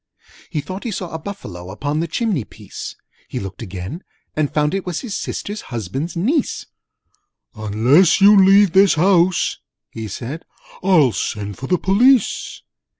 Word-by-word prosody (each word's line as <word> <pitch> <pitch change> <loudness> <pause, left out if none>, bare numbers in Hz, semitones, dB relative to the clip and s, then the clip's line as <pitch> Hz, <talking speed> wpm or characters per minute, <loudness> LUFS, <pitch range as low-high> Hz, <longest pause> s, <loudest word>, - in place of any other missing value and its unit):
He 155 -4 -2
thought 185 +6 -7
he 240 - -3
saw 185 -4 -5
a 160 - -4
Buffalo 100 - -8
Upon 145 +10 -3
the 165 - -1
chimney 195 - -1
piece: - - -9 0.3
He - - -4
looked 95 +2 -7
again, 95 - -6 0.3
and 155 -2 0
found 150 +1 +1
it 195 -1 -1
was 180 -2 -4
His 220 -6 -5
Sister's 205 +1 -4
Husband's 125 - -4
Niece. 255 - 0 0.9
'Unless 115 - +3
you 200 +1 +7
leave 195 0 +6
this 195 -1 +5
house,' 180 +1 +2 0.3
he 110 -1 -6
said, 125 - -6 0.4
"I'll 175 -9 +4
send 100 +1 -4
for 135 - -5
the 180 - +2
Police!' 230 +6 +2
165 Hz, 150 wpm, -20 LUFS, 115-195 Hz, 0.9 s, you